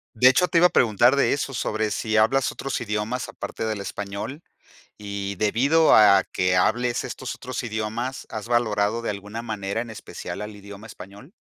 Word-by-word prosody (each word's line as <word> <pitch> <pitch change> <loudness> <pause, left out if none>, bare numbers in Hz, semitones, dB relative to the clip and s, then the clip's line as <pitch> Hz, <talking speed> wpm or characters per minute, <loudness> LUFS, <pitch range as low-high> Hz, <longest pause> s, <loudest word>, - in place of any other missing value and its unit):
De 125 +3 +7
hecho, 180 +8 +3
te 175 - +2
iba 175 - +7
a - - +2
preguntar 120 +3 +4
de 140 - +3
eso 140 -1 -2
sobre 110 -2 -1
si 110 +1 -1
hablas 120 +4 +3
otros 135 - -4
idiomas 110 +3 -3
aparte - - -6
del 110 -2 -2
español. 100 - -6 0.5
Y 100 -1 -5
debido 135 - +3
a 100 -3 +6
que 90 0 +1
hables 120 +6 +1
estos 130 - -5
otros 130 0 -6
idiomas, 115 +4 -4
¿has 110 -1 -6
valorado 115 -2 +1
de - - -2
alguna 105 +3 -6
manera, 105 -2 -3
en 115 -1 -6
especial 110 - -7
al 105 0 -7
idioma 100 +1 -11
español? 100 - -12
110 Hz, 180 wpm, -24 LUFS, 105-125 Hz, 0.5 s, De